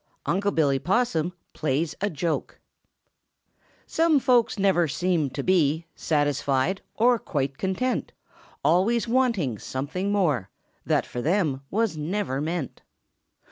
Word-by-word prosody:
UNC' 200 +3 0
BILLY 140 -4 +3
POSSUM 180 - +1 0.2
PLAYS 150 +2 -1
A 205 - +1
JOKE 165 -1 -3 1.3
Some 325 -3 +3
folks 245 -2 +3
never 190 -4 +3
seem 170 -1 0
to 140 +2 -5
be 165 -3 +2
Satisfied 145 +2 0
or 240 +1 +4
quite 140 -4 -3
content; 190 +8 -1 0.5
Always 225 +7 +3
wanting 225 - +1
something 160 +9 -3
more 150 - +1 0.4
That - - +2
fo' 125 - -5
them 155 -4 +1
was 215 -5 0
never 155 -3 -2
meant." 160 -2 -3
175 Hz, 115 wpm, -25 LUFS, 145-205 Hz, 1.3 s, or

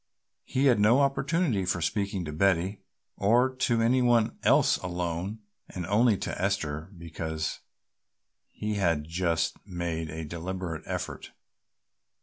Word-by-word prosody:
He 135 +2 0
had 125 -5 +5
no 110 +6 +5
opportunity 140 - +1
for 90 -1 0
speaking 100 +1 -1
to 75 - -5
Betty 95 +3 +1 0.4
or 120 +6 +3
to 120 -3 +2
any 125 +3 +3
one 120 -3 +3
else - - +4
alone 90 +3 -3 0.3
and 90 -2 -5
only 105 +3 +3
to - - -4
Esther 80 -5 -1
because 80 -1 -4 0.9
he 105 0 -3
had 85 -6 +1
just 80 -1 -1
made 85 -4 -4
a 80 +1 -5
deliberate 85 +1 -5
effort. - - -5
95 Hz, 130 wpm, -28 LUFS, 85-110 Hz, 0.9 s, had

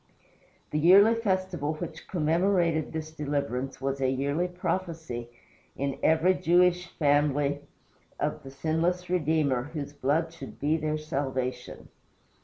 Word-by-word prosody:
The 150 - 0
yearly 195 +7 +7
festival 185 -8 -1
which 160 0 -7
commemorated 170 -1 +1
this 155 -1 -5
deliverance 140 -4 -3
was 135 0 -2
a 130 - +2
yearly 140 +6 0
prophecy 165 -9 -4 0.5
in 140 0 -3
every 160 +4 +4
Jewish 180 +1 +3
family 145 -1 +2 0.6
of - - -1
the 135 - -10
sinless 165 +6 -1
Redeemer 150 -6 +1
whose 145 -1 -4
blood 155 +4 0
should 135 -5 -10
be 150 +3 +2
their 155 -1 -1
salvation. 135 -4 -4
155 Hz, 120 wpm, -28 LUFS, 140-175 Hz, 0.6 s, yearly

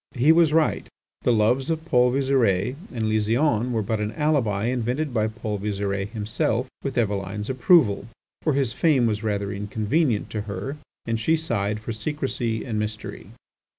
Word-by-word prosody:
He 135 +5 +5
was 165 -2 +5
right; 160 0 +2 0.3
the - - +2
loves 120 +5 +2
of 160 0 -2
Paul 125 -5 +4
Visire 125 -5 +2 0.2
and 115 -4 -2
Lysiane 115 +3 +1
were 110 -3 0
but 110 +1 -1
an 105 +1 -2
alibi 125 -10 +1
invented 125 +4 -1
by 110 -2 +1
Paul 110 -2 -4
Visire 100 -1 -2
himself, 110 +3 -1 0.2
with 135 -2 -3
Eveline's 105 0 -1
approval, 130 - +4 0.3
for 155 - +1
his 135 -4 0
fame 135 -3 +3
was 105 -2 0
rather 100 -2 -1
inconvenient 105 +5 0
to 105 - -2
her, 100 +9 -4 0.3
and 115 -1 -1
she 160 +9 +2
sighed 105 -9 -1
for 115 +1 -4
secrecy 120 -2 -2
and 110 -4 -2
mystery. 105 0 -5
115 Hz, 160 wpm, -24 LUFS, 105-135 Hz, 0.3 s, He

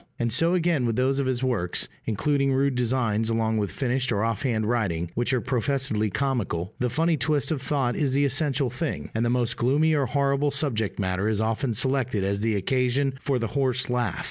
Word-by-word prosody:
And 115 -2 0
so 165 +7 +3
again 165 -8 +1
with 115 - 0
those 130 +3 +1
of 135 - 0
his 130 -1 -1
works 105 -9 0 0.2
including 140 +6 +1
rude 135 +1 +2
designs 115 -3 0
along 110 -1 +1
with 100 -2 -1
finished 130 -1 -1
or 105 -1 +1
off 115 -2 -1
hand 115 -5 0
writing 90 -8 -1
which 120 +3 0
are 130 - +2
professedly 130 -4 0
comical: 110 -7 -2
the 125 - +1
funny 165 +5 +1
twist 145 +3 0
of 150 -4 -1
thought 135 -4 0
is 140 -4 0
the 140 +1 +3
essential 135 -1 0
thing, 150 +4 -4
and 115 - 0
the 120 - +1
most 120 -1 0
gloomy 145 +6 +2
or 140 -3 +1
horrible 140 0 +1
subject 140 -7 -1
matter 95 +1 -1
is 110 -2 0
often 115 +2 0
selected 130 -4 0
as 100 +1 0
the 110 -1 +1
occasion 130 +6 +1
for 135 -2 0
the 115 -3 -2
horse 130 -3 0
laugh. 125 -1 -1
125 Hz, 205 wpm, -25 LUFS, 110-140 Hz, 0.2 s, so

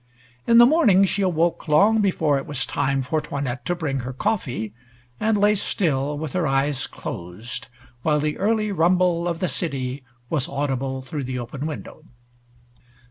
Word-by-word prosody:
In 230 - +6
the 240 - +10
morning 240 - +5
she 200 +1 -1
awoke 170 -3 +1
long 205 +9 +5
before 160 -8 +2
it 135 - -8
was 140 -3 -1
time 135 -1 0
for 155 +4 -1
'Toinette 135 -4 -4
to 175 - 0
bring 145 -6 -2
her 125 +1 -5
coffee, 125 - -2 0.5
and 220 -1 +2
lay 205 +1 +4
still, 150 -8 0
with 155 -1 -5
her 175 -4 +1
eyes 135 0 0
closed, 90 +8 -7 0.3
while 150 0 +2
the 150 0 -2
early 215 +1 +1
rumble 175 -1 +2
of 170 -1 -3
the 185 - +1
city 135 -4 -3 0.2
was 140 -1 0
audible 135 -1 -2
through 140 0 -4
the 130 0 -3
open 130 +5 -5
window. 155 0 -8
150 Hz, 165 wpm, -23 LUFS, 135-185 Hz, 0.5 s, the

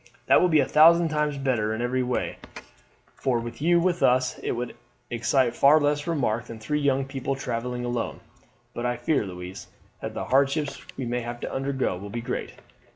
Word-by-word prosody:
"That - - +5
will 180 - +4
be 155 -3 +5
a - - 0
thousand 165 +2 +6
times 150 -1 0
better 120 -6 0
in 115 - -4
every 130 +1 0
way, 125 0 -2 0.7
for 125 -3 0
with 120 +1 -7
you 170 +2 +4
with 175 0 +1
us 125 0 +2
it - - -2
would 120 +1 -4 0.4
excite 120 +1 +1
far 145 +5 +6
less 145 +1 0
remark 120 -8 0
than 115 - -8
three 150 +7 -2
young 135 -2 +1
people 135 0 -3
travelling 125 -1 -3
alone. 120 -1 -3 0.5
But 120 +1 -2
I 120 0 -1
fear, 145 -8 0
Louise, 90 0 -8 0.3
that - - -5
the - - -3
hardships 140 +3 +1 0.2
we 130 - -3
may 120 +1 -1
have 120 +1 -6
to - - -5
undergo 135 -7 -1
will 100 +3 -8
be 115 +3 -4
great." 125 +2 -4
130 Hz, 195 wpm, -26 LUFS, 120-145 Hz, 0.7 s, thousand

